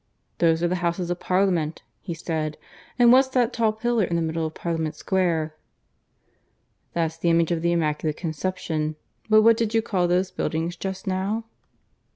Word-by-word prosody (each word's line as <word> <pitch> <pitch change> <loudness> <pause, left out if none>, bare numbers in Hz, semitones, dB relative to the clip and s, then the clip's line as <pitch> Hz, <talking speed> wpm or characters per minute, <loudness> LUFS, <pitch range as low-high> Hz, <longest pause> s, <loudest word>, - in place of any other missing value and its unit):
"Those 165 0 +3
are - - +4
the 180 +1 0
Houses 175 0 -1
of 175 - -2
Parliament," 180 -4 0 0.2
he 170 -4 -5
said. 155 -2 -3 0.4
"And 240 -1 +6
what's 260 +2 +6
that 250 -2 +1
tall 225 -2 +2
pillar 230 +1 0
in 170 -1 -1
the 170 - +1
middle 160 0 -1
of 155 - -10
Parliament 160 -2 -2
Square?" 165 -4 0 1.4
"That's 165 -1 -1
the 170 +1 0
image 165 0 +3
of 165 -1 0
the 170 +1 +1
Immaculate 155 -2 0
Conception. 160 -2 -3 0.3
But 215 0 +6
what 230 0 +6
did 225 -1 -1
you 225 - +3
call 185 -5 +1
those 180 +2 +1
buildings 165 0 -2
just 190 +2 -5
now?" 195 +4 -1
175 Hz, 175 wpm, -24 LUFS, 160-195 Hz, 1.4 s, And